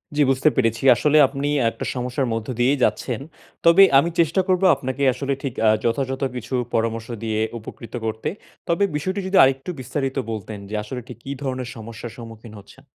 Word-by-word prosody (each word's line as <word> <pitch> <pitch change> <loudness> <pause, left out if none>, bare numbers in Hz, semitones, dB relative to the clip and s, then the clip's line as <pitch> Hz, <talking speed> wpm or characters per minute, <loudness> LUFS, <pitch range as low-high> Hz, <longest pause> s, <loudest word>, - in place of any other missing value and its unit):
জি 150 - +2
বুঝতে 135 +4 +3
পেরেছি। 115 -2 +1
আসলে 150 +3 +3
আপনি 140 +1 -3 0.2
একটা - - -7
সমস্যার 125 +1 -2
মধ্য 115 -1 -4
দিয়েই 135 +4 +3
যাচ্ছেন। 110 +2 0 0.5
তবে 170 +4 +8 0.2
আমি 170 - +1
চেষ্টা 170 +3 +3
করবো 185 0 +2
আপনাকে 130 +1 -5
আসলে 140 +2 -2
ঠিক 135 -4 -3
আ - - +7
যথাযথ 130 +3 -1
কিছু 125 +2 -6 0.2
পরামর্শ 115 0 -1 0.2
দিয়ে 110 -1 -1 0.2
উপকৃত 115 +1 -11
করতে। 110 0 -2 0.4
তবে 170 +4 +1
বিষয়টি 185 +7 -2
যদি 190 - +2
আরেকটু 135 +4 +1
বিস্তারিত 135 +1 -3
বলতেন 105 -1 -6
যে 110 - -4
আসলে 125 +4 -6
ঠিক 125 - -9
কী 135 - -5
ধরনের 130 -2 -3
সমস্যার 115 +1 -8
সম্মুখীন 115 -1 -11
হচ্ছেন? 120 +7 -17
130 Hz, 175 wpm, -22 LUFS, 115-140 Hz, 0.5 s, তবে